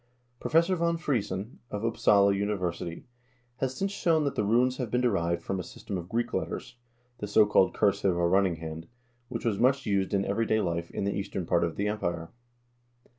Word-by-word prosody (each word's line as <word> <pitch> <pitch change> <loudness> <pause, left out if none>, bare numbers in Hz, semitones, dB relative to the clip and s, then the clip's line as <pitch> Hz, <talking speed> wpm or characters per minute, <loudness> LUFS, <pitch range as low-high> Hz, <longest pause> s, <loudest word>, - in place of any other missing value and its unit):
Professor 170 +4 +3
von 170 -1 +1
Friesen, 110 - -2
of 105 +2 -3
Upsala 100 -3 +4
Uni 100 +1 0
versity, 85 -3 -4 0.5
has 130 -1 -2
since 195 +5 -1
shown 165 -5 +2
that 140 - 0
the - - 0
runes 125 +5 +2
have 125 -4 -3
been 125 - +1
derived 85 -8 0
from 95 - -2
a - - -1
sys - - -12
tem - - -3
of 90 -1 -5
Greek 120 +1 -1
letters, - - -3 0.4
the 105 - -4
so 105 +1 +5
called 105 -2 +3
cursive 100 -3 +2
or 85 0 +2
running 95 -1 +3
hand, 80 0 -7 0.4
which - - -5
was 110 -4 0
much 130 +2 +3
used 100 -3 0
in 100 0 +1
everyday 110 +2 +1
life 85 -3 -2
in - - -4
the 100 0 0
eastern 95 -2 -3
part 85 0 +2
of 85 -1 -1
the 100 - -1
Empire. 85 -6 -3
100 Hz, 200 wpm, -28 LUFS, 90-120 Hz, 0.5 s, so